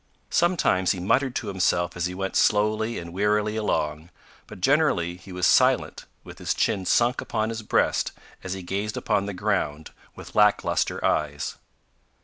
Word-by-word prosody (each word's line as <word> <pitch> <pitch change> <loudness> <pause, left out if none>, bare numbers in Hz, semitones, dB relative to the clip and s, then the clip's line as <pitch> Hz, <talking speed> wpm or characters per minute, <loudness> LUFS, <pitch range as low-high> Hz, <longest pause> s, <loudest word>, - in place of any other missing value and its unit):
Sometimes 160 - +2
he 95 - -6
muttered 125 +8 +1
to - - -3
himself 90 -2 0
as 90 0 -1
he 90 - -6
went 95 0 -4
slowly 110 +2 +2
and 85 0 -7
wearily 105 +2 +1
along, 80 -7 -2 0.4
but - - -11
generally 135 - +2
he 95 +1 -13
was 90 0 -1
silent - - +3 0.2
with - - -12
his - - -1
chin 95 -2 0
sunk 120 +1 +2
upon 110 +1 -2
his 115 0 -4
breast 105 - +1 0.3
as 95 - -4
he 95 -1 -7
gazed 100 +4 -3
upon 100 0 0
the 100 - -4
ground 90 -7 -2 0.2
with - - -11
lack 105 -1 +4
lustre - - -1
eyes. 75 -1 -1
100 Hz, 165 wpm, -25 LUFS, 90-110 Hz, 0.4 s, lack